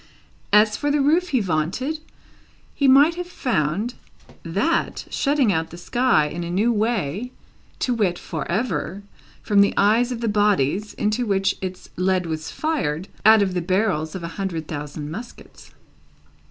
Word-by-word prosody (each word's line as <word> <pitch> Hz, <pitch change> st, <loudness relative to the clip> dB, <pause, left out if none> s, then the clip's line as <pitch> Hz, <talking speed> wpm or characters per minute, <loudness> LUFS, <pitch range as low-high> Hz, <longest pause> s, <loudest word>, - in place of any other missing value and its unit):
As 210 Hz, +1 st, +5 dB
for 290 Hz, -, -1 dB
the 290 Hz, +1 st, +2 dB
roof 320 Hz, +6 st, +3 dB
he 260 Hz, -6 st, +2 dB
vaunted, 190 Hz, -, -1 dB, 0.7 s
he 280 Hz, -, +1 dB
might 280 Hz, +5 st, +6 dB
have 355 Hz, +1 st, -5 dB
found 210 Hz, -, -1 dB, 0.5 s
that -, -, -1 dB
shutting 275 Hz, -7 st, +2 dB
out 160 Hz, -1 st, -1 dB
the 170 Hz, -, -10 dB
sky 240 Hz, -3 st, +2 dB
in 165 Hz, +3 st, -4 dB
a 170 Hz, -, -5 dB
new 205 Hz, +7 st, +2 dB
way 215 Hz, -, -1 dB, 0.5 s
to 250 Hz, -, 0 dB
wit, 195 Hz, -7 st, 0 dB
for 165 Hz, -1 st, -5 dB
ever, 195 Hz, -2 st, -2 dB, 0.4 s
from 205 Hz, -1 st, +4 dB
the 200 Hz, -, +3 dB
eyes 225 Hz, +5 st, +3 dB
of 240 Hz, -, -3 dB
the 230 Hz, -, -1 dB
bodies 205 Hz, -2 st, +1 dB
into 215 Hz, +3 st, 0 dB
which 195 Hz, -1 st, +1 dB
its 185 Hz, -1 st, -6 dB
lead 185 Hz, 0 st, +1 dB
was 160 Hz, -1 st, -4 dB
fired, 200 Hz, -, -2 dB, 0.2 s
out 220 Hz, -1 st, +7 dB
of 190 Hz, -2 st, -2 dB
the 180 Hz, -, -1 dB
barrels 180 Hz, -3 st, 0 dB
of 185 Hz, -, -6 dB
a -, -, -3 dB
hundred 165 Hz, -5 st, -3 dB
thousand 150 Hz, 0 st, -6 dB
muskets. 235 Hz, +8 st, -10 dB
200 Hz, 160 wpm, -22 LUFS, 170-245 Hz, 0.7 s, out